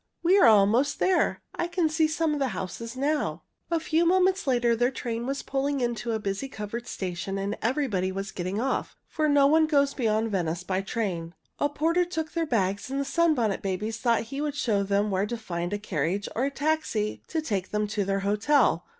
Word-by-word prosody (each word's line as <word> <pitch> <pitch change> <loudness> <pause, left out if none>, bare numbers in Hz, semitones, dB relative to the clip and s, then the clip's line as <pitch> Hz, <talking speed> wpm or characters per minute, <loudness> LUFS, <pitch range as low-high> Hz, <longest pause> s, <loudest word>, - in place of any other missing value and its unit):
We 355 +3 +5
are - - +7
almost 225 +6 +4
there. 370 -2 +1
I 345 - -2
can 345 -1 +1
see 315 0 +2
some 315 0 0
of 295 - -2
the 270 - +1
houses 230 +7 -6
now." 295 +3 -1 0.3
A 335 -1 +1
few 320 +1 +1
moments 370 0 +3
later 240 -2 +3
their 245 +2 +2
train 235 -2 -4
was 275 +1 -2
pulling 275 +1 -1
into 240 -1 -1
a - - +1
busy 200 +5 -3
covered 230 0 -6
station 190 +1 -4
and 200 +2 -2
everybody 225 -7 0
was 195 +1 -4
getting 185 +3 -3
off, 265 +3 -2
for 310 -2 0
no 285 -1 +5
one 315 +2 +4
goes 280 -2 +2
beyond 220 -3 0
Venice 175 -2 -1
by 185 +1 -1
train. 180 -6 -3 0.2
A 290 - +2
porter 330 +5 +1
took 320 -3 -4
their 335 -2 -1
bags, 200 -3 0
and 275 +1 -2
the 280 - -1
Sunbonnet 275 - +1
Babies 205 +3 -2
thought 230 -2 +2
he 275 +5 -5
would 295 -1 -2
show 220 -8 +1
them 200 +1 +1
where 195 +2 0
to 235 - -3
find 175 -5 -4
a 205 - -1
carriage 190 0 -2
or 250 - +1
a - - +1
taxi 285 -8 -1
to 325 - -2
take 200 -11 -2
them 210 0 0
to 205 0 0
their 195 0 -1
hotel. 210 - +2
235 Hz, 210 wpm, -27 LUFS, 200-295 Hz, 0.3 s, are